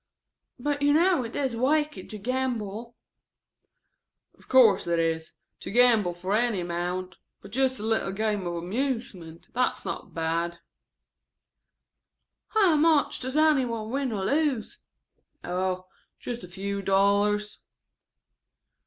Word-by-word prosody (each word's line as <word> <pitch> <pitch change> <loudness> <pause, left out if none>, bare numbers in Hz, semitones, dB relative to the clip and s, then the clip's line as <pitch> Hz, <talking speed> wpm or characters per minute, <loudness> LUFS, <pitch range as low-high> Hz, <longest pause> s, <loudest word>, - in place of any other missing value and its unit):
"But 285 +3 -2
you 290 0 +4
know 340 -2 +3
it 230 - -7
is 265 -4 -1
wicked 290 -3 0
to 215 - -5
gamble?" 235 -1 -3 1.4
"Of - - -22
course 225 -9 +5
it 170 0 +1
is, 165 -1 -1 0.3
to - - -7
gamble 220 -6 +4
for 185 +3 -2
any 230 -3 +1
amount, 175 +2 -3 0.2
but 200 - -13
just 260 +2 +1
a 210 - -7
little 220 -3 +1
game 210 0 -1
for 175 -1 -4
amusement, 185 -4 -4
that's 250 +1 0
not - - -6
bad." 165 +1 -1 1.9
"How 395 -7 +3
much 310 -1 +3
does 260 +3 -3
any 310 -3 +4
one 225 -2 -4
win 270 -1 -1
or 195 -3 -2
lose?" 290 - 0 0.6
"Oh, 185 0 -2 0.3
just 240 -4 -6
a - - -8
few 200 +3 -4
dollars." 200 +2 +2
220 Hz, 125 wpm, -27 LUFS, 185-260 Hz, 1.9 s, course